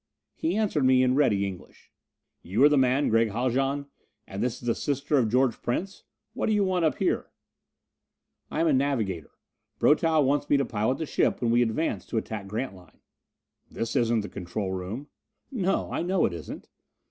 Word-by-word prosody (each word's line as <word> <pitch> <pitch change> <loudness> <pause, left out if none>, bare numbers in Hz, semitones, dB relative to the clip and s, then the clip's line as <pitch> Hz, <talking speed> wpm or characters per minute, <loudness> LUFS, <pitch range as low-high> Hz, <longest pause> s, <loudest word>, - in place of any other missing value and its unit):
He 320 - -2
answered 200 -10 +1
me 130 0 +5
in 125 0 +3
ready 105 -8 +2
English: 95 -2 -9 0.5
"You 100 +9 +1
are 145 - +8
the 150 - +3
man 130 +1 +3
Gregg 115 0 +3
Haljan? 135 +5 0 0.4
And 95 - -6
this 125 0 -1
is - - -12
the 120 - +2
sister 140 +2 0
of 115 -4 +1
George 125 0 +1
Prince 190 +11 -3 0.3
what 250 - -2
do 220 - +2
you 205 -1 +3
want 185 -2 0
up 155 - +2
here?" - - -1 1.2
"I 155 - -2
am 165 - +3
a 155 - +3
navigator. 115 - 0 0.5
Brotow 155 0 +3
wants 145 +2 0
me 145 - +5
to 140 - +1
pilot 110 +3 -1
the 160 - -3
ship - - +1
when 120 -2 +1
we 120 +1 +4
advance 120 +8 -1
to 115 - -3
attack 110 -2 -4
Grantline." 95 - -6 0.7
"This 115 - -4
is 120 -2 +2
not 115 -2 +1
the 105 - -6
control 95 +1 -4
room." 95 +9 -5 0.5
"No, 195 -7 -1
I - - -1
know 180 +2 +1
it - - -1
isn't." 85 -2 -8
130 Hz, 190 wpm, -27 LUFS, 110-145 Hz, 1.2 s, are